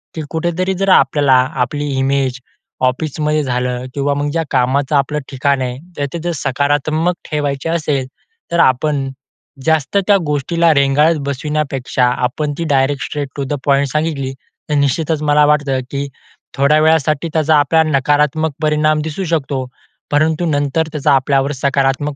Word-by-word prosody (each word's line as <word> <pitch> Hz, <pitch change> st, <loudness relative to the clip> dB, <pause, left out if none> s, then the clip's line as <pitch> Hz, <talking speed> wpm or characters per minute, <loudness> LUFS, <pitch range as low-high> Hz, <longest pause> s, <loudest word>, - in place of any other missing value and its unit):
की 160 Hz, -, -3 dB
कुठेतरी 175 Hz, +3 st, -1 dB
जर 195 Hz, -, +1 dB
आपल्याला 145 Hz, -6 st, +4 dB, 0.3 s
आपली 145 Hz, +4 st, -3 dB
इमेज 135 Hz, -1 st, 0 dB, 0.5 s
ऑफिसमध्ये 150 Hz, +2 st, -1 dB
झालं 125 Hz, -1 st, -2 dB
किंवा 140 Hz, 0 st, 0 dB
मग 145 Hz, +1 st, -1 dB
ज्या 165 Hz, +1 st, 0 dB
कामाचं 135 Hz, +3 st, +1 dB
आपलं 145 Hz, +2 st, +1 dB
ठिकाण 140 Hz, 0 st, 0 dB
आहे 125 Hz, -1 st, -3 dB, 0.2 s
तर 145 Hz, -, -1 dB
तिथे 170 Hz, +1 st, -3 dB
सकारात्मक 145 Hz, +6 st, 0 dB, 0.2 s
ठेवायचे 145 Hz, 0 st, -2 dB
असेल 150 Hz, -5 st, -1 dB, 0.4 s
तर 170 Hz, -, +1 dB
आपण 140 Hz, 0 st, +2 dB, 0.6 s
जास्त 160 Hz, +3 st, +1 dB
त्या 205 Hz, -1 st, +5 dB
गोष्टीला 160 Hz, +3 st, +2 dB
रेंगाळत 140 Hz, +4 st, +3 dB
बसविण्यापेक्षा 140 Hz, -2 st, -1 dB, 0.2 s
आपण 145 Hz, +4 st, -2 dB
ती 170 Hz, -, -2 dB
direct 135 Hz, +1 st, +1 dB
straight 145 Hz, -2 st, -4 dB
to 140 Hz, -, -1 dB
the 135 Hz, -, -3 dB
point 140 Hz, 0 st, +3 dB
सांगितली. 150 Hz, -4 st, -1 dB, 0.4 s
तर 150 Hz, -, +1 dB
निश्चितच 150 Hz, +2 st, 0 dB
मला 150 Hz, 0 st, +4 dB
वाटतं, 145 Hz, -3 st, +1 dB
की 140 Hz, 0 st, -3 dB, 0.5 s
थोड्या 140 Hz, +3 st, +4 dB
वेळासाठी 155 Hz, -1 st, +2 dB
त्याचा 155 Hz, -1 st, +3 dB
आपल्याला 160 Hz, +2 st, +2 dB
नकारात्मक 150 Hz, +3 st, +1 dB
परिणाम 155 Hz, 0 st, +2 dB
दिसू 160 Hz, +5 st, -4 dB
शकतो. 145 Hz, -5 st, -1 dB, 0.5 s
परंतु 155 Hz, +3 st, +1 dB
नंतर 145 Hz, +1 st, 0 dB
त्याचा 145 Hz, -2 st, +2 dB
आपल्यावर 135 Hz, +1 st, +2 dB
सकारात्मक 140 Hz, +1 st, 0 dB
145 Hz, 145 wpm, -16 LUFS, 135-155 Hz, 0.6 s, त्या